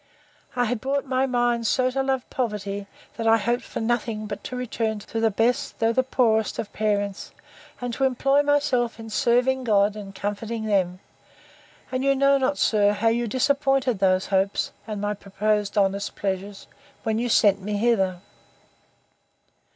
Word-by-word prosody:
I 245 Hz, -1 st, +2 dB
had 230 Hz, -1 st, -2 dB
brought 275 Hz, +1 st, -1 dB
my 260 Hz, 0 st, +1 dB
mind 240 Hz, -2 st, +1 dB
so 255 Hz, +2 st, +2 dB
to 270 Hz, +1 st, 0 dB
love 265 Hz, -1 st, -1 dB
poverty, 205 Hz, -4 st, -3 dB, 0.3 s
that 225 Hz, -1 st, -2 dB
I 225 Hz, 0 st, +6 dB
hoped 240 Hz, +3 st, 0 dB
for -, -, -6 dB
nothing 225 Hz, -2 st, -1 dB
but 210 Hz, -, -6 dB
to 255 Hz, -, -5 dB
return 225 Hz, -3 st, -2 dB
to 215 Hz, +2 st, -5 dB
the 225 Hz, 0 st, +3 dB
best, 225 Hz, +4 st, 0 dB
though 225 Hz, 0 st, +2 dB
the 260 Hz, -, +3 dB
poorest 230 Hz, -4 st, +1 dB
of 205 Hz, -, -5 dB
parents; 205 Hz, -2 st, -1 dB, 0.5 s
and 245 Hz, -1 st, -4 dB
to 270 Hz, -, +1 dB
employ 275 Hz, +2 st, +3 dB
myself 285 Hz, -5 st, +1 dB
in 225 Hz, -1 st, -8 dB
serving 250 Hz, +3 st, +2 dB
God, 210 Hz, -3 st, +3 dB
and 195 Hz, -2 st, -9 dB
comforting 215 Hz, +3 st, -4 dB
them; 185 Hz, -3 st, 0 dB, 0.9 s
and 255 Hz, 0 st, -1 dB
you 275 Hz, 0 st, +3 dB
know 275 Hz, +1 st, +4 dB
not, 265 Hz, +2 st, 0 dB
sir, 205 Hz, -1 st, +3 dB
how 215 Hz, +2 st, +2 dB
you 235 Hz, +1 st, 0 dB
disappointed 270 Hz, -1 st, +1 dB
those 185 Hz, -1 st, +2 dB
hopes, 195 Hz, 0 st, 0 dB, 0.2 s
and 210 Hz, -2 st, -4 dB
my 205 Hz, 0 st, -1 dB
proposed 210 Hz, +1 st, -1 dB
honest 200 Hz, 0 st, +1 dB
pleasures, 195 Hz, 0 st, -4 dB, 0.4 s
when 220 Hz, -1 st, 0 dB
you 245 Hz, +1 st, -1 dB
sent 205 Hz, -3 st, +4 dB
me 205 Hz, +2 st, -2 dB
hither. 195 Hz, -5 st, +1 dB
225 Hz, 165 wpm, -24 LUFS, 205-250 Hz, 0.9 s, I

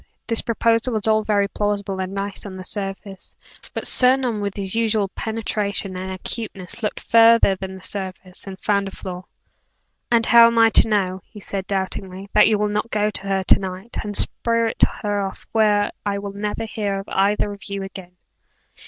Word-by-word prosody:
This 230 Hz, -1 st, 0 dB
proposal 230 Hz, +1 st, +1 dB
was 215 Hz, -2 st, 0 dB
all 215 Hz, 0 st, +3 dB
very 205 Hz, -2 st, +2 dB
plausible 200 Hz, -2 st, -2 dB
and 185 Hz, 0 st, -4 dB
nice 195 Hz, 0 st, -4 dB
on 190 Hz, -, -8 dB
the 185 Hz, -, -7 dB
surface, 195 Hz, -1 st, -7 dB, 0.4 s
but -, -, -4 dB
Sir 255 Hz, 0 st, +5 dB
Norman 240 Hz, -5 st, -2 dB
with 200 Hz, -1 st, -3 dB
his 195 Hz, -2 st, -4 dB
usual 220 Hz, -3 st, +1 dB
penetration 210 Hz, -3 st, -3 dB
and 185 Hz, +1 st, -5 dB
acuteness, 195 Hz, +1 st, -6 dB
looked 210 Hz, -, -2 dB
farther 230 Hz, -3 st, +5 dB
than 190 Hz, 0 st, -7 dB
the 190 Hz, -, -12 dB
surface, 185 Hz, -1 st, -6 dB
and 190 Hz, -1 st, -8 dB
found 200 Hz, -1 st, +1 dB
a -, -, -6 dB
flaw. 185 Hz, -1 st, -7 dB, 0.8 s
"And 230 Hz, -1 st, +3 dB
how 235 Hz, -1 st, +8 dB
am 235 Hz, 0 st, 0 dB
I 225 Hz, 0 st, +6 dB
to -, -, +6 dB
know," 190 Hz, -3 st, 0 dB
he 210 Hz, -, -13 dB
asked, 195 Hz, -1 st, -4 dB
doubtingly, 190 Hz, 0 st, -4 dB
"that 210 Hz, -, +6 dB
you 215 Hz, -, +3 dB
will 210 Hz, 0 st, +1 dB
not 210 Hz, +2 st, -2 dB
go 210 Hz, -1 st, +1 dB
to 200 Hz, -1 st, -5 dB
her 195 Hz, -1 st, 0 dB
to -, -, +5 dB
night 190 Hz, +4 st, -6 dB
and 205 Hz, -1 st, -2 dB
spirit 230 Hz, -1 st, 0 dB, 0.2 s
her 205 Hz, -1 st, 0 dB
off 195 Hz, -1 st, -5 dB
where 210 Hz, -2 st, +3 dB
I 200 Hz, -1 st, -1 dB
will 200 Hz, 0 st, -6 dB
never 210 Hz, +2 st, -3 dB
hear 210 Hz, -2 st, -2 dB
of 195 Hz, 0 st, -4 dB
either 205 Hz, +1 st, +1 dB
of 200 Hz, -, -11 dB
you 200 Hz, -1 st, -4 dB
again?" 190 Hz, -2 st, -9 dB
205 Hz, 195 wpm, -22 LUFS, 195-220 Hz, 0.8 s, how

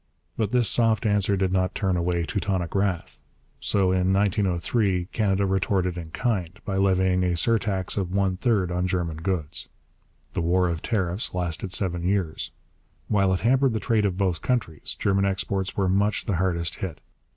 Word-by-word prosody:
But 110 Hz, -3 st, 0 dB
this 120 Hz, -1 st, +2 dB
soft 115 Hz, -2 st, +2 dB
answer 100 Hz, -1 st, +2 dB
did 95 Hz, -1 st, 0 dB
not 95 Hz, +1 st, 0 dB
turn 95 Hz, -2 st, 0 dB
away 85 Hz, 0 st, 0 dB
Teutonic 95 Hz, -3 st, -2 dB
wrath; 95 Hz, -3 st, -1 dB, 0.4 s
so 95 Hz, -2 st, +2 dB
in 95 Hz, 0 st, +2 dB
1903 95 Hz, -1 st, +1 dB
Canada 100 Hz, -3 st, +1 dB
retorted 95 Hz, -2 st, 0 dB
in 85 Hz, -2 st, -7 dB
kind, 95 Hz, -3 st, -2 dB
by 95 Hz, -1 st, -2 dB
levying 95 Hz, -1 st, +2 dB
a 90 Hz, -1 st, +1 dB
surtax 100 Hz, -1 st, 0 dB
of 95 Hz, -3 st, -1 dB
one 95 Hz, -1 st, +1 dB
third 95 Hz, -3 st, +1 dB
on 90 Hz, +1 st, 0 dB
German 85 Hz, -4 st, -2 dB
goods. 80 Hz, -3 st, -3 dB, 0.7 s
The -, -, -1 dB
war 90 Hz, +2 st, +2 dB
of 85 Hz, -2 st, -3 dB
tariffs 95 Hz, -3 st, -2 dB
lasted 90 Hz, +1 st, -1 dB
seven 90 Hz, -2 st, +1 dB
years. 90 Hz, -3 st, -1 dB, 0.6 s
While 100 Hz, -3 st, +3 dB
it 95 Hz, -, 0 dB
hampered 130 Hz, +2 st, +3 dB
the 110 Hz, -, -1 dB
trade 110 Hz, 0 st, +1 dB
of 90 Hz, -2 st, -3 dB
both 95 Hz, -4 st, 0 dB
countries, 115 Hz, -, -2 dB
German 100 Hz, 0 st, +1 dB
exports 95 Hz, 0 st, -1 dB
were 95 Hz, -2 st, +2 dB
much 100 Hz, +3 st, +1 dB
the 100 Hz, -6 st, 0 dB
hardest 85 Hz, -2 st, 0 dB
hit. 90 Hz, -6 st, -5 dB
95 Hz, 170 wpm, -25 LUFS, 90-100 Hz, 0.7 s, While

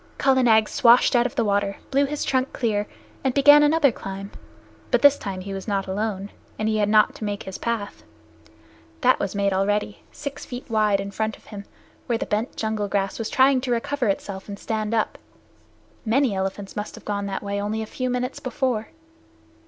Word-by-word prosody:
Kala 265 Hz, -1 st, +3 dB
Nag 220 Hz, -3 st, +4 dB
swashed 240 Hz, +1 st, +5 dB
out 240 Hz, 0 st, +4 dB
of 255 Hz, -, -12 dB
the 235 Hz, -5 st, +1 dB
water, 200 Hz, -1 st, 0 dB
blew 280 Hz, +1 st, +3 dB
his 295 Hz, +1 st, -3 dB
trunk 260 Hz, 0 st, 0 dB
clear, 210 Hz, -4 st, -1 dB, 0.4 s
and 265 Hz, -2 st, 0 dB
began 290 Hz, +1 st, +8 dB
another 295 Hz, -2 st, +4 dB
climb. 195 Hz, -1 st, -7 dB, 0.6 s
But -, -, +1 dB
this 285 Hz, 0 st, +8 dB
time 190 Hz, -2 st, -5 dB
he 195 Hz, +1 st, -6 dB
was 195 Hz, +1 st, -6 dB
not 195 Hz, -2 st, 0 dB
alone, 200 Hz, 0 st, -3 dB, 0.3 s
and 215 Hz, -, -1 dB
he 215 Hz, 0 st, +1 dB
had 205 Hz, -1 st, +1 dB
not 215 Hz, 0 st, +4 dB
to -, -, -9 dB
make 205 Hz, -1 st, -3 dB
his 190 Hz, -, -7 dB
path. 230 Hz, -3 st, -3 dB, 1.0 s
That 255 Hz, -1 st, +4 dB
was 200 Hz, 0 st, -3 dB
made 200 Hz, -1 st, +1 dB
already, 205 Hz, +2 st, 0 dB
six 285 Hz, 0 st, -7 dB
feet 245 Hz, 0 st, -8 dB
wide, 210 Hz, -2 st, +3 dB
in 200 Hz, 0 st, -4 dB
front 220 Hz, +1 st, -2 dB
of -, -, -25 dB
him, 205 Hz, -2 st, -9 dB, 0.4 s
where 235 Hz, -, +1 dB
the -, -, -3 dB
bent 215 Hz, +3 st, -2 dB
jungle 220 Hz, -2 st, -2 dB
grass 195 Hz, +1 st, -1 dB
was 225 Hz, -, -3 dB
trying 265 Hz, 0 st, +4 dB
to 255 Hz, -1 st, -3 dB
recover 245 Hz, +2 st, -1 dB
itself 195 Hz, -1 st, -3 dB
and 200 Hz, -, -6 dB
stand 215 Hz, +1 st, -2 dB
up. 220 Hz, -, -1 dB, 0.8 s
Many 245 Hz, +1 st, +2 dB
elephants 195 Hz, +1 st, -4 dB
must 210 Hz, 0 st, -5 dB
have -, -, -14 dB
gone 200 Hz, -1 st, -2 dB
that 195 Hz, -, -4 dB
way 200 Hz, 0 st, -2 dB
only 215 Hz, +2 st, -2 dB
a -, -, -5 dB
few 255 Hz, +3 st, -3 dB
minutes 250 Hz, +1 st, -2 dB
before. 255 Hz, -4 st, -2 dB
215 Hz, 200 wpm, -24 LUFS, 200-250 Hz, 1.0 s, began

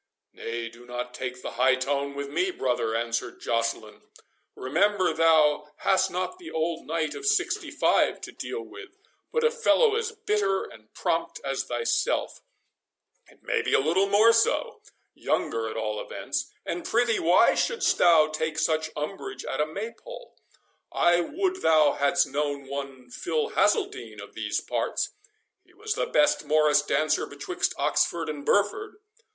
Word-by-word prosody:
"Nay, 115 Hz, 0 st, -5 dB
do 115 Hz, +1 st, -13 dB
not 125 Hz, 0 st, -5 dB
take 125 Hz, 0 st, -6 dB
the -, -, -5 dB
high 130 Hz, +2 st, +3 dB
tone 140 Hz, +1 st, -2 dB
with 140 Hz, 0 st, -4 dB
me, 175 Hz, +7 st, 0 dB
brother" 120 Hz, -8 st, -1 dB
answered 115 Hz, 0 st, -2 dB
Joceline; 115 Hz, -2 st, -2 dB, 0.5 s
"remember 185 Hz, +6 st, +1 dB
thou 155 Hz, -2 st, +3 dB
hast 190 Hz, 0 st, +3 dB
not 185 Hz, -, -4 dB
the 345 Hz, -, -9 dB
old 165 Hz, +1 st, -2 dB
knight 160 Hz, 0 st, -1 dB
of -, -, -8 dB
sixty 425 Hz, 0 st, +1 dB
five -, -, +2 dB
to -, -, -7 dB
deal 445 Hz, -, -5 dB
with, 400 Hz, 0 st, -12 dB, 0.3 s
but 470 Hz, -, 0 dB
a 465 Hz, -, +4 dB
fellow 460 Hz, -1 st, +3 dB
as 455 Hz, 0 st, -1 dB
bitter 210 Hz, -, 0 dB
and 110 Hz, -1 st, -14 dB
prompt 165 Hz, 0 st, -1 dB
as 135 Hz, -1 st, -2 dB
thyself—it 120 Hz, -1 st, -5 dB
may -, -, 0 dB
be -, -, +1 dB
a -, -, +5 dB
little 170 Hz, +8 st, +2 dB
more 215 Hz, +3 st, +6 dB
so— 230 Hz, 0 st, +1 dB, 0.3 s
younger, 115 Hz, -1 st, -1 dB
at 110 Hz, -, -6 dB
all 105 Hz, -1 st, -2 dB
events—and 175 Hz, +1 st, -5 dB
prithee, 235 Hz, -1 st, +1 dB
why 175 Hz, +3 st, +5 dB
shouldst 475 Hz, -1 st, +1 dB
thou 165 Hz, -3 st, +6 dB
take 155 Hz, 0 st, -3 dB
such 160 Hz, 0 st, 0 dB
umbrage 195 Hz, -, -5 dB
at 135 Hz, -, -2 dB
a 150 Hz, -, +1 dB
Maypole? 230 Hz, -, -8 dB, 0.6 s
I 175 Hz, 0 st, +3 dB
would 370 Hz, -, -1 dB
thou 155 Hz, -, +4 dB
hadst 145 Hz, +5 st, +2 dB
known 145 Hz, 0 st, -3 dB
one 135 Hz, -2 st, -7 dB
Phil 460 Hz, -, -2 dB
Hazeldine 420 Hz, -1 st, 0 dB
of -, -, -10 dB
these -, -, -2 dB
parts—He 435 Hz, +1 st, -5 dB
was 430 Hz, +1 st, -3 dB
the -, -, -2 dB
best 295 Hz, -, +3 dB
morris 150 Hz, 0 st, +4 dB
dancer 150 Hz, +1 st, 0 dB
betwixt -, -, -3 dB
Oxford 165 Hz, -2 st, 0 dB
and 145 Hz, -2 st, -5 dB
Burford." 205 Hz, -, +1 dB
160 Hz, 150 wpm, -26 LUFS, 135-230 Hz, 0.6 s, more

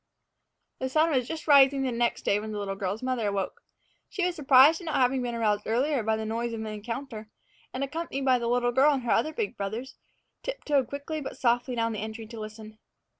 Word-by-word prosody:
The 260 Hz, -, -2 dB
sun 315 Hz, +4 st, +3 dB
was 255 Hz, -4 st, +1 dB
just 320 Hz, -1 st, -6 dB
rising 275 Hz, -2 st, +6 dB
next 240 Hz, -2 st, 0 dB
day 200 Hz, -, +2 dB
when 215 Hz, +1 st, -6 dB
the 210 Hz, -, -4 dB
little 200 Hz, -1 st, -3 dB
girl's 195 Hz, +3 st, -4 dB
mother 255 Hz, -4 st, -1 dB
awoke. 200 Hz, -1 st, -3 dB, 0.5 s
She 380 Hz, -3 st, -1 dB
was 360 Hz, -1 st, -1 dB
surprised 290 Hz, +2 st, +6 dB
at -, -, -9 dB
not 315 Hz, -2 st, -2 dB
having 255 Hz, +1 st, +2 dB
been 240 Hz, -1 st, -3 dB
aroused 210 Hz, -3 st, 0 dB
earlier 260 Hz, +4 st, +1 dB
by 220 Hz, 0 st, +1 dB
the 220 Hz, -, -4 dB
noise 230 Hz, +2 st, -2 dB
of 225 Hz, -, -4 dB
an -, -, -4 dB
encounter, 220 Hz, +1 st, -6 dB, 0.4 s
and, 260 Hz, -, -3 dB
accompanied 275 Hz, -1 st, -4 dB
by 255 Hz, -2 st, +4 dB
the 235 Hz, -, -2 dB
little 245 Hz, 0 st, +2 dB
girl 270 Hz, +4 st, +5 dB
and 255 Hz, -3 st, -3 dB
the -, -, +1 dB
other 310 Hz, +7 st, +1 dB
big 420 Hz, -, -3 dB
brothers, 220 Hz, +7 st, -5 dB, 0.4 s
tiptoed 295 Hz, -, -1 dB
quickly 290 Hz, +2 st, -5 dB
but 270 Hz, -, -7 dB
softly 245 Hz, +1 st, +1 dB
down 230 Hz, -1 st, 0 dB
the 215 Hz, -, -4 dB
entry 220 Hz, +1 st, -6 dB
to 225 Hz, +1 st, -9 dB
listen. 215 Hz, 0 st, -9 dB
245 Hz, 220 wpm, -27 LUFS, 220-275 Hz, 0.5 s, rising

